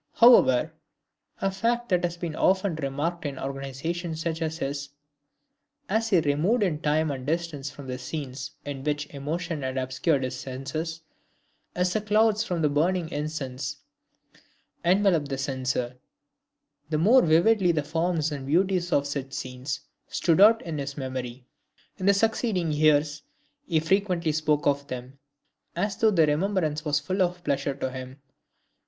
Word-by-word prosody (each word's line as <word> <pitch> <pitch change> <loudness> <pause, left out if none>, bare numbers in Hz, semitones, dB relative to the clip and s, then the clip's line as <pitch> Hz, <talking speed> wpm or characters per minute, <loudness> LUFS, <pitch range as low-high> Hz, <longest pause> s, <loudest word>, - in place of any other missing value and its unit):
However, 160 - +6 0.7
(a 195 - +1
fact 235 +5 -1
that 180 -2 +2
has 175 0 -1
been 170 -3 -4
often 190 +1 +2
remarked 150 +4 -2
in 140 -3 -4
organizations 140 +5 -4
such 165 0 -3
as 160 0 -2
his,) 140 -1 -3 1.0
as 225 +1 +1
he 200 - +3
was 165 - +3
removed 170 +11 +2
in 160 -6 -1
time 155 +1 +1
and 130 -2 -5
distance 160 -4 -2
from 140 0 -11
the 125 -1 -5
scenes 135 -1 -5 0.2
in 140 -2 -5
which 145 0 -1
emotion 155 +3 -3
had 130 0 -3
obscured 130 +3 0
his 130 0 -2
senses, 145 +6 -5 0.7
as 180 0 +1
the 215 - 0
clouds 215 +1 +3
from 175 -3 -2
the - - +5
burning 165 +3 +1
incense 145 -4 -4 1.1
envelope 180 -4 +3
the 135 -1 -3
censer, 130 -2 -2 0.9
the 155 - 0
more 225 +11 +6
vividly 175 +4 +4
the 155 -3 0
forms 160 0 0
and 140 -2 -5
beauties 180 +3 +1
of 140 - +2
such 140 -1 -4
scenes 130 +2 -4 0.3
stood 165 +1 +2
out 225 +2 +7
in 160 -3 -4
his 140 +1 -5
memory. 130 -2 -5 0.5
In 185 - -2
the 200 - +6
succeeding 210 -5 +1
years, 150 0 +3 0.5
he 160 -3 +2
frequently 175 -1 +1
spoke 150 -1 +1
of 140 0 +1
them, 130 +1 -7 0.6
as 200 +3 -1
though 220 - +4
the 170 -6 +4
remembrance 155 -1 0
was 150 -2 +1
full 185 +6 -2
of 175 -1 0
pleasure 140 0 -1
to 130 -1 -3
him. 130 +1 -8
155 Hz, 155 wpm, -26 LUFS, 140-180 Hz, 1.1 s, out